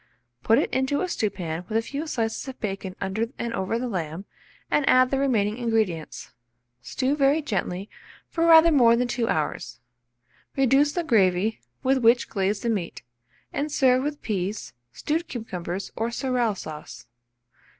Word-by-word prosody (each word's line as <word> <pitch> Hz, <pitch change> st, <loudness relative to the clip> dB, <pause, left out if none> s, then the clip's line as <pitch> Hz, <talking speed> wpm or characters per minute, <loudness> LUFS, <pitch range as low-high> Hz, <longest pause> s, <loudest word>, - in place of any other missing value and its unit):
Put 225 Hz, -, +4 dB
it 290 Hz, -, +1 dB
into 265 Hz, +4 st, +1 dB
a 370 Hz, -, 0 dB
stewpan 180 Hz, -, -3 dB
with 220 Hz, -, +1 dB
a 225 Hz, -, 0 dB
few 285 Hz, +6 st, -5 dB
slices 225 Hz, -4 st, -2 dB
of 265 Hz, -, -8 dB
bacon 195 Hz, -3 st, -4 dB
under 200 Hz, +4 st, -2 dB
and 235 Hz, 0 st, -3 dB
over 190 Hz, +2 st, -1 dB
the 250 Hz, +1 st, -3 dB
lamb, 175 Hz, -3 st, -4 dB, 0.5 s
and 295 Hz, -, +3 dB
add 255 Hz, 0 st, +5 dB
the 270 Hz, -, +1 dB
remaining 225 Hz, -5 st, +1 dB
ingredients. 220 Hz, -9 st, -2 dB, 0.5 s
Stew 260 Hz, -, -1 dB
very 280 Hz, +1 st, +3 dB
gently 190 Hz, -5 st, -3 dB, 0.4 s
for 335 Hz, 0 st, 0 dB
rather 330 Hz, 0 st, +8 dB
more 240 Hz, -6 st, +6 dB
than 245 Hz, +1 st, 0 dB
2 240 Hz, -1 st, -1 dB
hours. 120 Hz, -6 st, -2 dB, 0.8 s
Reduce 270 Hz, +2 st, +3 dB
the 350 Hz, -, -1 dB
gravy, 205 Hz, -, +2 dB, 0.2 s
with 265 Hz, +1 st, +3 dB
which 235 Hz, 0 st, +3 dB
glaze 200 Hz, +1 st, -1 dB
the 235 Hz, -, -1 dB
meat, 190 Hz, -, -4 dB, 0.5 s
and 295 Hz, +2 st, -2 dB
serve 255 Hz, -3 st, +3 dB
with 295 Hz, +1 st, -4 dB
peas, 200 Hz, 0 st, -3 dB, 0.2 s
stewed 320 Hz, -, -2 dB
cucumbers, 190 Hz, -6 st, -5 dB
or 225 Hz, +1 st, -1 dB
sorrel 240 Hz, -3 st, 0 dB
sauce. 150 Hz, -8 st, -9 dB
230 Hz, 160 wpm, -25 LUFS, 195-270 Hz, 0.8 s, rather